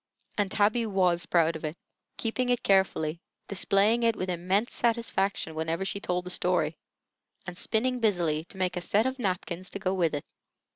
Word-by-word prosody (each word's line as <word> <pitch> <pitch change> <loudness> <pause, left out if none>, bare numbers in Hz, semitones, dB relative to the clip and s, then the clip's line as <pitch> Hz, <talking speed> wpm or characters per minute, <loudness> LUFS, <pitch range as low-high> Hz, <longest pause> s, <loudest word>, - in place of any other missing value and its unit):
And 205 -2 +1
Tabby 220 +4 +2
was 180 -4 +1
proud 165 -1 +3
of 160 - -7
it, 155 +2 -4 0.4
keeping 245 +2 -1
it 245 -1 +1
carefully, 175 -5 +2 0.3
displaying 200 +4 +3
it 230 -1 +3
with 185 -2 -2
immense 185 +6 0
satisfaction 215 -7 0
whenever 160 +4 -2
she 195 +1 -3
told 180 -2 -2
the 180 - -2
story, 175 -4 +1 0.7
and 175 - -6
spinning 250 +6 0
busily 175 -8 +1
to 190 - -10
make 185 -1 0
a 180 - -2
set 210 +5 +2
of 260 0 -2
napkins 185 -3 -2
to - - -5
go 190 -1 -1
with 170 -5 +1
it. 145 - -4
190 Hz, 180 wpm, -28 LUFS, 175-215 Hz, 0.7 s, proud